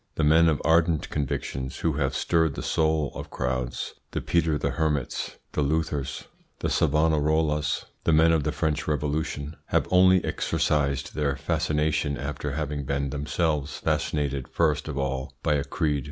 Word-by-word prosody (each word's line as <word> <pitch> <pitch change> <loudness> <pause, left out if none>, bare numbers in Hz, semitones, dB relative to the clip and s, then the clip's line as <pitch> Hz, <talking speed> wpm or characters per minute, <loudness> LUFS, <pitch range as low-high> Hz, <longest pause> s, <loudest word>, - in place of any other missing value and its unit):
The 80 - 0
men 80 +2 +6
of 75 - +1
ardent 80 -2 +3
convictions 65 -2 -3
who 80 - +1
have 70 -2 -1
stirred 80 -4 +1
the - - -5
soul 80 -2 +1
of - - -7
crowds, 65 -1 -3 0.2
the - - 0
Peter 80 -3 +1
the - - -1
Hermits, 75 -5 -1
the - - -1
Luthers, 75 -2 -1 0.3
the - - -2
Savonarolas, 75 0 +2 0.2
the - - +2
men 80 +1 +5
of 80 -3 +2
the - - 0
French 75 -2 -1
Revolution, 75 0 -2
have - - +1
only 95 0 +5
exercised 75 -4 0
their 70 -2 0
fascination 75 0 0
after 70 +1 -4
having 75 -1 -2
been 70 0 -1
themselves 75 +1 -1
fascinated 75 -4 -1
first 75 -2 +1
of 75 -3 -4
all 65 -1 -2
by - - +2
a 70 -1 +1
creed. 75 0 0
75 Hz, 155 wpm, -26 LUFS, 70-80 Hz, 0.3 s, men